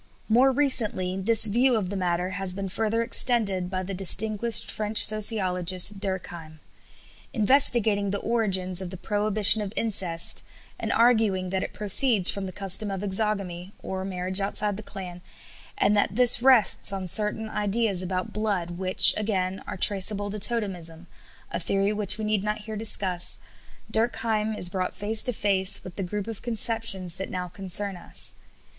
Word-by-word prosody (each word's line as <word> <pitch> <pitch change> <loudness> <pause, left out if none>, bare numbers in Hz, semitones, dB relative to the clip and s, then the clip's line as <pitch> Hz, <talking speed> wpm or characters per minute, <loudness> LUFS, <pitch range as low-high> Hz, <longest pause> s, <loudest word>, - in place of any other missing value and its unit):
" - - -35
More 265 +2 +3
recently 220 -9 0
this 215 +4 +4
view 240 +4 +1
of 200 -4 -4
the - - -6
matter 180 -1 -3
has 190 -1 -2
been 195 -1 -6
further 225 +3 -3
extended 210 -7 +2
by 185 0 -5
the 195 +2 -7
distinguished 210 +4 +3
French 215 0 +3
sociologist, 190 -3 +1
Durkheim. 175 -5 -8 0.7
Investigating 220 -4 +3
the 200 - -3
origins 190 -5 0
of 185 - -7
the 185 - -9
prohibition 210 +2 +4
of 200 -2 -6
incest, 185 -7 +2 0.4
and - - -5
arguing 220 -6 0
that 190 -1 -3
it - - -6
proceeds 210 -1 +4
from 200 -1 -6
the - - -8
custom 195 +2 -2
of 195 -1 -6
exogamy 195 -2 -4
(or 190 0 -6
marriage 185 0 -2
outside 205 +1 -1
the 210 - -8
clan), 185 -4 -11 0.6
and 210 - 0
that 205 -1 -1
this 245 0 +4
rests 255 -6 +3
on 190 -2 -6
certain 210 +4 0
ideas 210 -2 -2
about 185 0 -5
blood, 185 -5 -4
which, 185 0 +5
again, 190 -3 -4
are - - -7
traceable 205 +1 +3
to 210 - -6
totemism, 185 -7 -3 0.5
a - - -4
theory 195 +3 -1
which 210 -1 -1
we 220 - -6
need 210 -2 -2
not 210 0 -4
here 215 +1 -9
discuss, 190 -5 +1 0.5
Durkheim 220 -1 -2
is 180 - +2
brought 185 0 -5
face 215 +2 +3
to 250 - -2
face 195 -4 -1
with 185 - -12
the - - -5
group 195 +2 -6
of 225 -3 -9
conceptions 225 -6 -1
that 190 - -7
now 180 -1 -6
concern 195 +2 -3
us. 175 - -4
200 Hz, 165 wpm, -23 LUFS, 185-220 Hz, 0.7 s, which